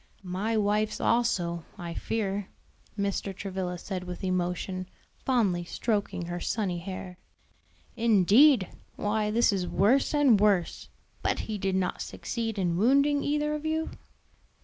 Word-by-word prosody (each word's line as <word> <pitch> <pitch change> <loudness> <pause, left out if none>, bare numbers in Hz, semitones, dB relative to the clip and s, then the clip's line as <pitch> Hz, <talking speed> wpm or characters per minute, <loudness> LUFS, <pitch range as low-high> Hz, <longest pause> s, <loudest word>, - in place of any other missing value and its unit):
"My 195 +5 -1
wife's 210 +1 +1
also, 175 -8 +1
I 170 -3 -5
fear," 200 0 -2 0.5
Mr. 200 -1 -2
Travilla 185 -2 -4
said 185 +1 -5
with 180 +1 -7
emotion, 185 0 -2 0.3
fondly 205 -9 +1
stroking 205 0 -2
her 175 +1 -4
sunny 185 -3 -1
hair. 185 0 -7 0.8
"Indeed! 225 - +5 0.3
why 210 0 0
this 230 0 +3
is 185 -2 -1
worse 245 +11 +3
and 270 -8 +5
worse! 200 -4 +1 0.3
But - - 0
he 215 -2 -4
did 190 0 0
not 185 -1 -1
succeed 225 -2 -4
in 175 -3 0
wounding 280 +7 +3
either 300 +1 0
of 300 0 -4
you?" 315 0 -1
200 Hz, 130 wpm, -28 LUFS, 180-230 Hz, 0.8 s, Indeed